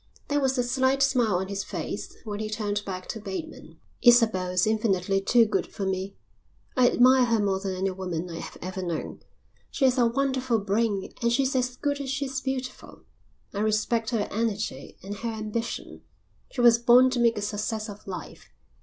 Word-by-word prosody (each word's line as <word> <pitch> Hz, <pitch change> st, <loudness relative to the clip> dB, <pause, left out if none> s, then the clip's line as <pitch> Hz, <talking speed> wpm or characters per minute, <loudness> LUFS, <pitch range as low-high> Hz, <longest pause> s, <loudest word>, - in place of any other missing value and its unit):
There 290 Hz, 0 st, +2 dB
was 265 Hz, -1 st, +1 dB
a 245 Hz, -, +2 dB
slight 260 Hz, +2 st, +2 dB
smile 245 Hz, -7 st, +2 dB
on 190 Hz, +1 st, -1 dB
his 200 Hz, 0 st, -3 dB
face -, -, -5 dB
when 210 Hz, -3 st, -5 dB
he 215 Hz, 0 st, -3 dB
turned 210 Hz, -1 st, -2 dB
back 185 Hz, -2 st, -6 dB
to 225 Hz, -, -4 dB
Bateman. 210 Hz, +10 st, -7 dB, 0.2 s
"Isabel 225 Hz, -7 st, +5 dB
is 180 Hz, 0 st, +2 dB
infinitely 195 Hz, -3 st, +1 dB
too 230 Hz, +4 st, +5 dB
good 215 Hz, -, -1 dB
for 195 Hz, -, -5 dB
me. 190 Hz, +1 st, -2 dB, 0.6 s
I 250 Hz, -1 st, +5 dB
admire 255 Hz, +1 st, +5 dB
her 230 Hz, -2 st, +2 dB
more 195 Hz, -2 st, +1 dB
than 195 Hz, -1 st, -3 dB
any 190 Hz, +1 st, -1 dB
woman 180 Hz, -2 st, -4 dB
I 165 Hz, -1 st, -6 dB
have -, -, -8 dB
ever 185 Hz, +1 st, -4 dB
known. 170 Hz, -3 st, -4 dB, 0.5 s
She 270 Hz, -, 0 dB
has 255 Hz, 0 st, +3 dB
a 240 Hz, -, +5 dB
wonderful 260 Hz, -1 st, 0 dB
brain 205 Hz, -1 st, 0 dB
and 235 Hz, 0 st, +2 dB
she's 265 Hz, +2 st, +1 dB
as 250 Hz, -1 st, 0 dB
good 285 Hz, +1 st, -2 dB
as 270 Hz, -, -5 dB
she's 270 Hz, -1 st, -2 dB
beautiful. 265 Hz, -1 st, -5 dB, 0.5 s
I 200 Hz, -, -3 dB
respect 215 Hz, +2 st, +1 dB
her 225 Hz, -4 st, 0 dB
energy 215 Hz, -1 st, -3 dB
and 200 Hz, +2 st, -6 dB
her 230 Hz, +2 st, -3 dB
ambition. 220 Hz, +1 st, -4 dB, 0.5 s
She 250 Hz, -, -3 dB
was 235 Hz, -1 st, +6 dB
born 245 Hz, +2 st, +6 dB
to 250 Hz, -, -1 dB
make 235 Hz, -1 st, +3 dB
a -, -, -2 dB
success 215 Hz, +1 st, -3 dB
of 205 Hz, -1 st, -11 dB
life. 185 Hz, -2 st, -8 dB
225 Hz, 190 wpm, -26 LUFS, 200-250 Hz, 0.6 s, was